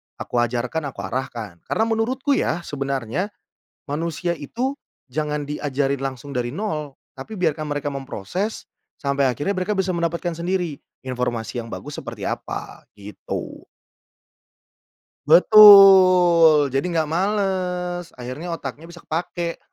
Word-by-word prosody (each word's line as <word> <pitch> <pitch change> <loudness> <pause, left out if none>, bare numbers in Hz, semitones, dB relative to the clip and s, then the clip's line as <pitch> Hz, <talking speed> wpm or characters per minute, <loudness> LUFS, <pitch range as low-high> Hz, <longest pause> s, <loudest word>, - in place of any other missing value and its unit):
aku 120 - -3
ajarkan, 125 +6 -1
aku 135 - -7
arahkan. 115 -8 -5
Karena 220 - +1
menurutku 250 +5 -1
ya, 170 +2 -1
sebenarnya, 140 - -3 0.6
manusia 165 +3 -2
itu 245 - -3 0.4
jangan 150 +1 -2
diajarin 140 -2 -2
langsung 135 +1 -5
dari 120 -1 -1
0 150 - -4 0.2
tapi 165 +11 -8
biarkan 155 -3 -1
mereka 145 0 -3
memproses, 140 - -4 0.3
sampai 140 -2 +1
akhirnya 145 +10 -2
mereka 185 +3 -1
bisa 190 -1 +1
mendapatkan 170 0 -2
sendiri, 175 -2 -2 0.3
informasi 120 -2 -3
yang 115 - -11
bagus 145 +1 -7
seperti - - -7
apa, - - -5 0.2
gitu. 100 -1 -7 1.7
Betul, 180 - +8
jadi 135 +3 0
enggak 160 -3 -1
males, 180 -2 -1
akhirnya 130 +8 -5
otaknya 150 +2 -8
bisa 170 0 -13
kepakai. 170 +1 -3
155 Hz, 120 wpm, -22 LUFS, 135-180 Hz, 1.7 s, Betul